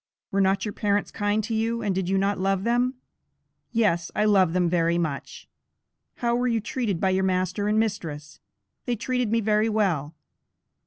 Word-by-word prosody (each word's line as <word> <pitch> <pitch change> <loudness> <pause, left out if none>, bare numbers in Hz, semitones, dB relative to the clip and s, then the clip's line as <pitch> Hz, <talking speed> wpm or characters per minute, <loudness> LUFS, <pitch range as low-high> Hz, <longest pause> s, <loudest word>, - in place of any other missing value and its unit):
"Were 195 - +2
not 195 +1 +2
your 210 - -4
parents 205 -1 0
kind 205 +1 0
to 225 - -3
you, 230 +1 -1
and 200 -2 0
did 185 -1 -2
you 195 - +2
not 195 0 0
love 195 0 0
them?" 245 +3 +1 0.8
"Yes 205 -8 +1
I 210 - +2
love 195 -5 +4
them 180 -1 +2
very 170 0 +2
much." 155 -5 -4 0.7
"How 235 -1 0
were 245 +1 +1
you 230 -2 +1
treated 230 - -2
by 190 +1 +2
your 190 0 +1
master 185 +2 0
and 215 +1 +2
mistress?" 160 -9 -3 0.5
"They 245 - +1
treated 250 0 -1
me 230 0 +2
very 215 +1 +2
well." 175 -9 0
205 Hz, 180 wpm, -25 LUFS, 185-225 Hz, 0.8 s, love